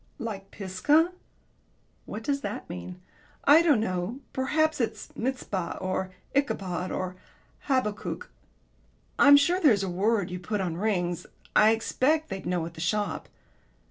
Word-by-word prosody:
"Like 210 Hz, -6 st, -6 dB
'Pisgah'?" 255 Hz, -, +2 dB, 1.0 s
"What 215 Hz, +2 st, -6 dB
does 280 Hz, +2 st, 0 dB
that 205 Hz, 0 st, -5 dB
mean?" 90 Hz, -, -7 dB, 0.4 s
"I 295 Hz, +4 st, +7 dB
don't 300 Hz, -8 st, +4 dB
know. 185 Hz, +3 st, -2 dB
Perhaps 305 Hz, +2 st, +1 dB
it's 230 Hz, -, -4 dB
'Mizpah,' 220 Hz, -8 st, -3 dB
or 185 Hz, 0 st, -2 dB, 0.3 s
'Ichabod,' 185 Hz, -10 st, -1 dB
or 185 Hz, 0 st, -3 dB, 0.5 s
'Habakkuk.' 255 Hz, -7 st, -1 dB, 0.9 s
I'm 285 Hz, 0 st, +9 dB
sure 345 Hz, +6 st, +3 dB
there's 220 Hz, -, +5 dB
a 190 Hz, -, -2 dB
word 200 Hz, +1 st, +1 dB
you 180 Hz, -, -4 dB
put 205 Hz, +4 st, -2 dB
on 180 Hz, -4 st, -2 dB
rings 175 Hz, -3 st, -1 dB, 0.3 s
I 215 Hz, -, +7 dB
expect 290 Hz, +8 st, +1 dB
they'd 190 Hz, -2 st, -5 dB
know 175 Hz, -2 st, 0 dB
at 170 Hz, -, -8 dB
the 160 Hz, -, -8 dB
shop." 205 Hz, +5 st, -1 dB
210 Hz, 140 wpm, -27 LUFS, 185-270 Hz, 1.0 s, I'm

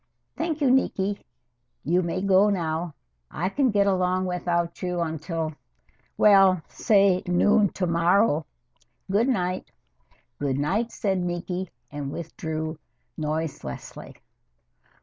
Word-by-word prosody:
"Thank 320 Hz, -2 st, -2 dB
you, 275 Hz, -, +4 dB
Niki. 205 Hz, -6 st, +1 dB, 0.6 s
You 175 Hz, +5 st, +2 dB
may 180 Hz, +2 st, -2 dB
go 195 Hz, +1 st, +5 dB
now 165 Hz, -4 st, -2 dB, 0.3 s
I 180 Hz, +4 st, -2 dB
can 270 Hz, +4 st, +1 dB
get 205 Hz, -2 st, +3 dB
along 185 Hz, -1 st, +1 dB
without 175 Hz, -1 st, -1 dB
you 180 Hz, -1 st, -2 dB
until 160 Hz, 0 st, -3 dB, 0.6 s
well, 195 Hz, -4 st, +5 dB
say 195 Hz, -4 st, +3 dB
noon 205 Hz, +4 st, +4 dB
to 185 Hz, -, -1 dB
morrow. 170 Hz, -1 st, +2 dB, 0.6 s
Good 215 Hz, +5 st, +3 dB
night." 185 Hz, -6 st, -1 dB, 0.7 s
"Good 140 Hz, -2 st, -1 dB
night," 205 Hz, +11 st, 0 dB
said 195 Hz, -4 st, -1 dB
Niki, 180 Hz, +1 st, -3 dB, 0.2 s
and 145 Hz, -2 st, -5 dB
withdrew 160 Hz, -1 st, -5 dB, 0.4 s
noiselessly. 155 Hz, -, -5 dB
180 Hz, 110 wpm, -25 LUFS, 160-200 Hz, 0.7 s, go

